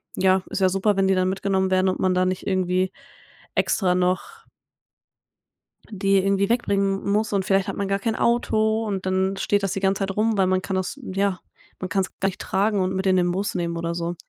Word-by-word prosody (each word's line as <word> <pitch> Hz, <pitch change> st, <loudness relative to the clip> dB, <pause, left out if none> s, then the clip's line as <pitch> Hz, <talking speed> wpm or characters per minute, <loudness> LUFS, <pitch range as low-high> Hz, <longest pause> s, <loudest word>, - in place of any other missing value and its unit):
ja, 190 Hz, 0 st, +3 dB
ist -, -, -3 dB
ja 190 Hz, -, +4 dB
super, 195 Hz, +2 st, +1 dB
wenn 195 Hz, 0 st, +3 dB
die 190 Hz, -, +3 dB
dann 185 Hz, 0 st, +1 dB
mitgenommen 190 Hz, 0 st, 0 dB
werden 185 Hz, 0 st, +3 dB
und 185 Hz, -, -2 dB
man 185 Hz, -1 st, +1 dB
da 185 Hz, 0 st, +2 dB
nicht 185 Hz, 0 st, -3 dB
irgendwie 185 Hz, -1 st, 0 dB, 0.6 s
extra 185 Hz, -4 st, +2 dB
noch 185 Hz, -, -2 dB, 1.4 s
die 195 Hz, -1 st, +1 dB
irgendwie 195 Hz, +1 st, +1 dB
wegbringen 200 Hz, -4 st, 0 dB
muss 215 Hz, +1 st, 0 dB
und 195 Hz, -2 st, 0 dB
vielleicht 195 Hz, 0 st, +2 dB
hat -, -, -4 dB
man 200 Hz, -, -2 dB
gar 195 Hz, 0 st, 0 dB
kein 220 Hz, +2 st, -1 dB
Auto 220 Hz, -2 st, +1 dB
und 195 Hz, -3 st, -3 dB
dann 190 Hz, +1 st, 0 dB
steht 205 Hz, 0 st, 0 dB
das 195 Hz, -, 0 dB
die -, -, -2 dB
ganze 195 Hz, 0 st, +1 dB
Zeit 195 Hz, 0 st, -2 dB
rum, 220 Hz, 0 st, +1 dB
weil 190 Hz, -, +3 dB
man 185 Hz, 0 st, +1 dB
kann 185 Hz, +3 st, -3 dB
das 190 Hz, +9 st, -3 dB
ja, 195 Hz, -4 st, -1 dB, 0.4 s
man 185 Hz, -, -5 dB
kann's 195 Hz, -2 st, -1 dB
gar 195 Hz, -, +1 dB
nicht 195 Hz, -, -9 dB
tragen 200 Hz, +2 st, 0 dB
und 185 Hz, 0 st, -1 dB
mit 190 Hz, +1 st, -2 dB
in 190 Hz, -, +4 dB
den 175 Hz, -1 st, +2 dB
Bus 195 Hz, +3 st, -2 dB
nehmen 170 Hz, -1 st, -2 dB
oder 170 Hz, 0 st, -3 dB
so. 170 Hz, 0 st, -3 dB
190 Hz, 225 wpm, -23 LUFS, 185-200 Hz, 1.4 s, ja